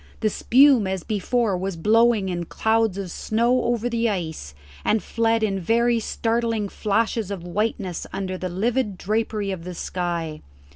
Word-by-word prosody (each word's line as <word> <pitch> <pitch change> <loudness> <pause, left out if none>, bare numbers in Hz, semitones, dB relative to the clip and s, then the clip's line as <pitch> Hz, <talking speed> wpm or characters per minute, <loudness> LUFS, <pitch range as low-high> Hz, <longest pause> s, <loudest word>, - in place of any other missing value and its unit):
The 215 -2 +2
spume 260 -3 +5
as 190 -2 -3
before 215 0 0
was 190 +1 -3
blowing 215 +2 +3
in 175 -1 -3
clouds 220 +1 +1
of 190 -3 -5
snow 235 +6 +1
over 240 0 0
the 235 -1 +1
ice, 160 - -4 0.3
and 215 0 +1
fled 230 -1 +1
in 195 -3 0
very 235 +5 +2
startling 225 -2 -1
flashes 220 0 0
of 195 -4 -5
whiteness 190 -1 -2
under 190 -1 -3
the 185 0 -4
livid 210 +2 -1
drapery 210 0 -1
of 180 -3 -5
the 180 0 -7
sky. 170 -4 -3
210 Hz, 155 wpm, -23 LUFS, 185-230 Hz, 0.3 s, spume